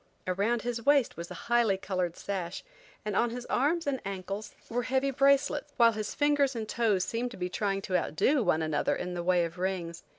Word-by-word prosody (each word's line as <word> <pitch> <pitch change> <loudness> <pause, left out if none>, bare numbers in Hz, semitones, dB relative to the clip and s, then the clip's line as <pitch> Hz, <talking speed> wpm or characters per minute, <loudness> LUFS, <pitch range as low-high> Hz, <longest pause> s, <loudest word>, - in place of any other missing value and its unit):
Around 205 +6 0
his 240 -1 -3
waist 280 -2 +3
was 170 +1 -7
a 180 - -7
highly 235 -5 +3
colored 185 -3 -2
sash, 185 -3 -4 0.4
and 210 -2 -2
on 240 - +3
his 245 +1 -6
arms 320 +6 +1
and 275 -2 -1
ankles 195 +2 -5
were 245 +2 -1
heavy 265 +2 0
bracelets, 280 +2 +2
while 235 -2 +6
his 215 -1 -4
fingers 290 -2 +2
and 220 -2 -3
toes 210 -6 +1
seemed 235 +2 -2
to 245 - -11
be 180 0 -2
trying 195 +1 -1
to 185 - -2
outdo 270 - +2
one 160 -7 +2
another 155 -1 0
in 180 0 -4
the 175 - -3
way 175 0 +3
of 170 +2 -8
rings. 180 -3 -2
215 Hz, 205 wpm, -29 LUFS, 185-250 Hz, 0.4 s, while